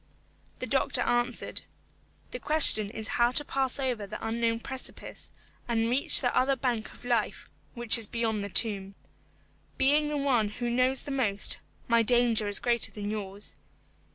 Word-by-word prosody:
The - - -6
doctor - - 0
answered, 240 0 -1 0.7
"The - - -6
question 290 -9 +6
is 220 0 -7
how 240 0 +4
to 295 - +1
pass 270 -2 +2
over 245 -6 -3
the - - -7
unknown 230 0 -1
precipice 265 0 -8 0.4
and 230 -1 -1
reach 265 +3 +5
the 245 -2 -1
other 270 +1 +2
bank 240 -4 -3
of - - -16
life, 235 -3 -2 0.2
which 240 -1 +4
is 220 - -1
beyond 225 -3 -3
the 200 - -6
tomb. 200 -2 -1 0.8
Being 290 +2 +2
the 300 - -3
one 250 -7 0
who 240 +3 -5
knows 255 +2 +1
the 285 - -7
most, 220 -7 -1 0.3
my 235 -1 +3
danger 235 -2 +2
is 205 - 0
greater 235 -1 +1
than 205 0 -6
yours. 205 -1 -7
235 Hz, 160 wpm, -27 LUFS, 215-255 Hz, 0.8 s, question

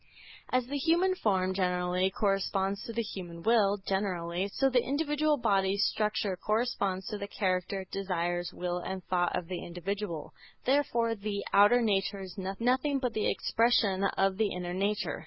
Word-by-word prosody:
As 255 -1 +2
the 285 +3 -3
human 345 +6 +3
form, 190 - +1
generally, 180 0 +1
corresponds 195 0 0
to - - -5
the 230 +1 -1
human 175 -5 -7
will, 210 -3 +4
generally, 190 -2 -2
so 270 +7 +1
the 250 -2 +3
individual 295 +1 +1
bodily 200 -5 +2
structure 210 -1 0
corresponds 200 -3 -1
to 210 - -4
the 200 - -4
character, 190 -1 -1
desires, 175 -2 -2
will 180 0 -3
and 185 +1 -5
thought 175 0 0
of 170 - -5
the 180 0 -5
individual. 175 -1 -4 0.3
Therefore 245 -4 +2
the 205 -1 -4
outer 220 +5 +6
nature 200 -2 +1
is 185 -2 -8
nothing 245 +9 0
but 250 -3 -2
the 215 - +1
expression 220 -4 +2
of 195 0 +2
the 215 -2 +1
inner 180 -1 -4
nature. 200 +3 -1
200 Hz, 155 wpm, -30 LUFS, 185-230 Hz, 0.3 s, outer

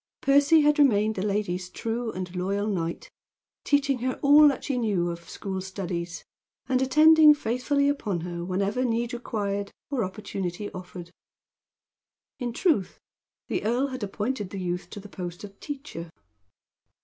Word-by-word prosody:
Percy 285 +3 +5
had 295 +1 +3
remained 220 -6 +4
the 190 - -4
lady's 195 -3 -1
true 230 +3 -3
and 185 -2 -6
loyal 195 +3 -1
knight, 170 -5 -3 0.5
teaching 280 -2 +2
her 255 +2 -2
all 295 +2 +8
that 275 -3 0
she 275 - -2
knew 200 -8 0
of 170 0 -9
school 190 -1 -4
studies, 175 -3 -5 0.4
and 260 -1 +1
attending 305 +3 +7
faithfully 280 +3 0
upon 210 - -1
her 170 0 -5
whenever 195 +7 -1
need 235 -1 -1
required, 205 -4 -3 0.2
or 260 -5 0
opportunity 190 0 -5
offered. 180 -2 -9 1.3
In 245 -2 -2
truth, 255 - +1 0.5
the - - -2
earl 245 +6 +1
had 255 -1 -6
appointed 205 +1 -3
the 195 - -6
youth 180 0 -3
to 205 - -8
the 205 - -11
post 175 -2 -7
of 200 -1 -11
teacher. 270 - -7
210 Hz, 150 wpm, -26 LUFS, 185-265 Hz, 1.3 s, all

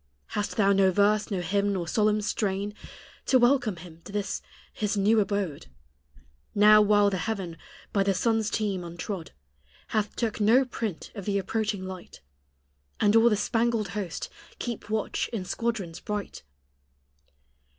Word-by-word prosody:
Hast 205 - -3
thou 200 -2 +4
no 195 -1 +4
verse, 205 +3 +2
no 195 -4 -1
hymn, 200 +3 0
or 170 -2 -3
solemn 215 +3 +2
strain, 205 -1 -1 0.5
To 260 - +5
welcome 245 -4 +3
Him 170 -1 -12
to - - -9
this 205 -1 -2 0.3
His 210 -1 -1
new 210 +3 +4
abode 200 - -2 0.9
Now 210 +1 +7
while 205 -1 +4
the 190 - -1
heaven, 195 -6 -3 0.4
by 200 - +3
the 195 -1 +2
sun's 220 +2 +1
team 205 -4 -1
untrod, 170 0 -6 0.6
Hath 210 -2 -1
took 225 -2 -2
no 240 +6 +5
print 225 -7 -5
of 200 -4 -7
the 200 -1 0
approaching 205 0 -2
light, 185 - -9 0.8
And 205 +1 +3
all 225 +1 +7
the 210 - +2
spangled 225 -1 0
host 195 -3 -4 0.3
keep 235 -3 -5
watch 215 -1 -1
in 210 -6 -3
squadrons 205 -7 -3
bright? 210 -1 -5
205 Hz, 150 wpm, -27 LUFS, 195-220 Hz, 0.9 s, Now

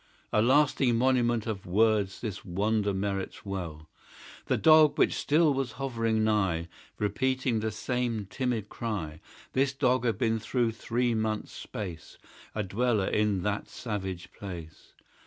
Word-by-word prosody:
A 105 - +4
lasting 130 0 +3
monument 120 -2 +2
of 105 -6 -4
words 105 0 +2
This 105 -5 -5
wonder 105 +3 0
merits 95 0 -3
well. 85 -6 -5 0.6
The - - +2
Dog, 155 -1 +6
which - - +4
still 155 0 +3
was 135 -3 -2
hovering 115 -5 0
nigh, 95 -6 +1 0.3
Repeating 130 +2 0
the 110 +1 -1
same 115 0 -2
timid 120 0 -2
cry, 95 -11 -4 0.3
This 135 +1 +2
Dog 130 -2 +2
had 115 -5 +1
been 115 0 +1
through 120 +1 0
three 120 +2 -1
months 110 -1 -1
space 95 -9 -7 0.4
A 105 - 0
dweller 105 +1 +1
in 105 -4 +1
that 105 0 -1
savage 95 -6 -5
place. 85 -5 -9
110 Hz, 140 wpm, -29 LUFS, 100-125 Hz, 0.6 s, Dog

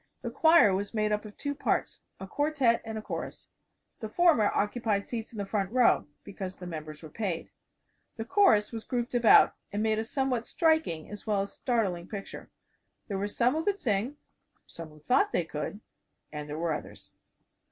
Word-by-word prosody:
The - - -3
choir 320 - +5
was 200 +4 -3
made 215 -1 +1
up 210 +1 -1
of 210 - -11
two 285 -1 -3
parts, 285 - -1 0.2
a 190 - -6
quartette 280 -1 +1
and 220 -1 -5
a 215 - -6
chorus. - - -6 0.5
The 220 - -5
former 305 -7 +4
occupied 210 -1 0
seats 230 0 -5
in 225 - -11
the 200 - -2
front 195 -1 -2
row 250 -9 +3 0.2
because 190 -2 -7
the 180 - -9
members 155 -2 -7
were 155 - -9
paid. 190 -5 -3 0.7
The 225 - -4
chorus 230 - +4
was 225 -2 -6
grouped 240 -1 -3
about, 240 -2 +6 0.2
and 205 +1 -1
made 220 0 +1
a - - -1
somewhat 250 0 -1
striking 315 - +1
as 210 +1 -9
well 205 -2 +2
as 200 - -8
startling 195 -9 -1
picture. 200 -2 -8 0.6
There 195 -2 -2
were 200 - -1
some 240 +4 +1
who 320 +1 -1
could 400 +2 0
sing; 235 - -1 0.5
some 165 -1 -10
who 150 - -17
thought 325 - +2
they 175 - +1
could; 155 +7 -5 0.5
and 150 -1 -6
there 150 - -4
were 165 -1 0
others. 150 - -8
215 Hz, 190 wpm, -29 LUFS, 190-245 Hz, 0.7 s, about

